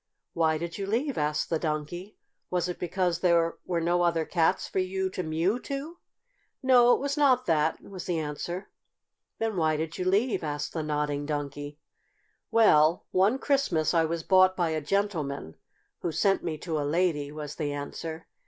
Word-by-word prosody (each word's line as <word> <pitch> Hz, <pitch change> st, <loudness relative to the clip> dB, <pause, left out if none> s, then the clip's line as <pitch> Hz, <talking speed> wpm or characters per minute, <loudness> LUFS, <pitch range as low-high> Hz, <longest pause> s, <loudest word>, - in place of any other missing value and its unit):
"Why 160 Hz, -1 st, +2 dB
did 170 Hz, +4 st, -5 dB
you 195 Hz, -, -3 dB
leave?" 250 Hz, +6 st, 0 dB
asked 150 Hz, +2 st, -1 dB
the 165 Hz, -, +1 dB
Donkey. 165 Hz, +5 st, -4 dB, 0.3 s
"Was 180 Hz, -1 st, 0 dB
it 180 Hz, -, -5 dB
because 180 Hz, -1 st, 0 dB
there 170 Hz, -2 st, +2 dB
were 175 Hz, -2 st, 0 dB
no 175 Hz, +1 st, +1 dB
other 170 Hz, -2 st, +2 dB
cats 170 Hz, +2 st, +1 dB
there -, -, -17 dB
for -, -, 0 dB
you 190 Hz, 0 st, -1 dB
to 185 Hz, -, -3 dB
mew 170 Hz, +7 st, 0 dB
to?" 285 Hz, +6 st, -6 dB, 0.6 s
"No, 245 Hz, -2 st, +6 dB
it -, -, -4 dB
was 280 Hz, +1 st, -2 dB
not 260 Hz, -4 st, +4 dB
that," 160 Hz, -1 st, +1 dB
was 185 Hz, -3 st, -8 dB
the 175 Hz, -2 st, 0 dB
answer. 160 Hz, +4 st, -4 dB, 0.7 s
"Then 225 Hz, -3 st, -2 dB
why 155 Hz, -2 st, +2 dB
did 160 Hz, +1 st, -4 dB
you 180 Hz, -, -1 dB
leave?" 205 Hz, +3 st, +1 dB
asked 150 Hz, -1 st, -3 dB
the 160 Hz, -, -2 dB
Nodding 150 Hz, -1 st, -2 dB
Donkey. 145 Hz, -1 st, -4 dB, 0.7 s
"Well, 165 Hz, -7 st, +4 dB
one 200 Hz, +7 st, +3 dB
Christmas 270 Hz, -, +1 dB
I 165 Hz, -1 st, +3 dB
was 165 Hz, 0 st, -3 dB
bought 185 Hz, 0 st, +5 dB
by 170 Hz, -3 st, +1 dB
a 155 Hz, -1 st, -1 dB
gentleman 150 Hz, -, -2 dB, 0.5 s
who 170 Hz, -, -2 dB
sent 195 Hz, +5 st, +2 dB
me 160 Hz, -3 st, -3 dB
to 160 Hz, -1 st, -3 dB
a -, -, 0 dB
lady," 150 Hz, -1 st, 0 dB
was 150 Hz, -1 st, -6 dB
the 150 Hz, -3 st, -2 dB
answer. 160 Hz, +3 st, -6 dB
170 Hz, 180 wpm, -28 LUFS, 155-190 Hz, 0.7 s, No